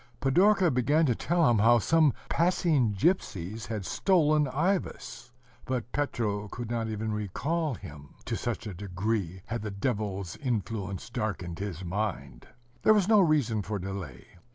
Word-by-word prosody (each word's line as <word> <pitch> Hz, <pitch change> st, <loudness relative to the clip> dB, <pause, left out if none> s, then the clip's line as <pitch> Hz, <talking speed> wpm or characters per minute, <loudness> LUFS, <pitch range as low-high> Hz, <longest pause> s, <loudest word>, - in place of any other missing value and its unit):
Pidorka 180 Hz, +6 st, +4 dB
began 145 Hz, +6 st, +3 dB
to 125 Hz, -, +3 dB
tell 165 Hz, +7 st, +1 dB
him 115 Hz, -3 st, +3 dB
how 120 Hz, +3 st, +6 dB
some 155 Hz, +6 st, +4 dB, 0.2 s
passing 160 Hz, -, +2 dB
gypsies 105 Hz, -, -1 dB
had 105 Hz, -4 st, -4 dB
stolen 155 Hz, -, +3 dB
Ivas; 155 Hz, -5 st, -2 dB, 0.3 s
but 125 Hz, -2 st, -3 dB
Petro 105 Hz, -8 st, -1 dB
could 120 Hz, +2 st, -6 dB
not 115 Hz, -1 st, -1 dB
even 110 Hz, 0 st, -3 dB
recall 140 Hz, -, -2 dB
him 75 Hz, -6 st, -11 dB
to -, -, -2 dB
such 105 Hz, -, -3 dB
a 105 Hz, -, -5 dB
degree 95 Hz, 0 st, -3 dB
had 115 Hz, -1 st, -4 dB
the 105 Hz, -, -4 dB
Devil's 100 Hz, -3 st, -3 dB
influence 110 Hz, -, -3 dB
darkened 105 Hz, -8 st, -3 dB
his 95 Hz, -3 st, -5 dB
mind! 95 Hz, -, -4 dB, 0.3 s
There 215 Hz, -, +6 dB
was 200 Hz, -3 st, +2 dB
no 215 Hz, -1 st, +6 dB
reason 145 Hz, -, +2 dB
for 105 Hz, +1 st, -3 dB
delay. 90 Hz, -10 st, -6 dB
115 Hz, 150 wpm, -28 LUFS, 100-150 Hz, 0.3 s, how